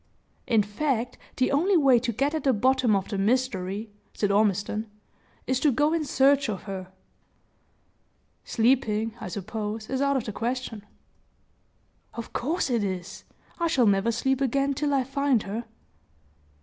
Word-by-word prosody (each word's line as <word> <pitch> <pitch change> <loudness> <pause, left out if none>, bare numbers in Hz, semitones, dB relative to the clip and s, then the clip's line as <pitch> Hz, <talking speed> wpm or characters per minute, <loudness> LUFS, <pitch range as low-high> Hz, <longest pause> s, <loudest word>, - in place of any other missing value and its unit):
"In 220 -3 +4
fact, 240 +3 -2 0.2
the 255 - +2
only 350 +7 +3
way 270 -6 +5
to 235 0 -2
get 275 +7 0
at 315 -3 -2
the 270 - +3
bottom 255 0 +3
of 195 -1 -2
the 200 - -2
mystery," 210 -2 -1 0.2
said 205 -1 0
Ormiston, 210 +1 +1 0.6
"is 260 0 0
to 295 - +3
go 295 +5 +2
in 330 -2 0
search 275 0 +3
of 200 -3 -4
her. 190 -2 -7 1.5
Sleeping, 225 -2 +1
I - - -5
suppose, 215 +2 -5
is 265 0 0
out 280 -1 +2
of 255 - -2
the 215 - -5
question." 235 -2 -3 1.3
"Of 235 - -7
course 300 +2 -1
it 235 -3 +1
is! 185 -1 -5 0.3
I 340 - +2
shall 270 -7 +3
never 200 +2 +3
sleep 265 +3 0
again 275 +2 +1
till 290 +2 -1
I 275 -2 +2
find 270 -3 +1
her!" 220 +4 -5
240 Hz, 155 wpm, -26 LUFS, 210-270 Hz, 1.5 s, way